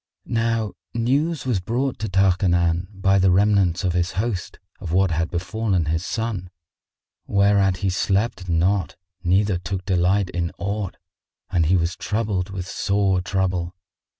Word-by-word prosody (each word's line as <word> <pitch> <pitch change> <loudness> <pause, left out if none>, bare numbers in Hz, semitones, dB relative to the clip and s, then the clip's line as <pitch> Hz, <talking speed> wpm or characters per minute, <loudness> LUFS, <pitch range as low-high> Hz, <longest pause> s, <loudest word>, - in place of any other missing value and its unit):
Now 115 -2 0 0.2
news 140 +7 0
was 120 -7 +1
brought 125 +8 -2
to 110 0 -3
Tarkanan 90 -2 +2
by 95 0 +2
the 95 0 +4
remnants 95 -2 +3
of 90 -2 +1
his 90 +1 0
host 100 -2 -3 0.2
of 90 -5 -6
what 95 0 +3
had 85 +1 0
befallen 95 0 -1
his 80 +2 -1
son, 105 -3 -3 0.8
whereat 100 -2 +3
he 95 - +2
slept 95 0 0
not 90 +4 +1 0.3
neither 95 +1 +2
took 90 +2 -4
delight 95 +1 +2
in 85 -1 -2
aught, 100 -1 -3 0.5
and 85 -4 +2
he 95 +3 +4
was 85 +1 0
troubled 105 -4 -2
with 95 -2 -5
sore 100 -2 +1
trouble. 90 -2 -1
95 Hz, 145 wpm, -23 LUFS, 90-105 Hz, 0.8 s, the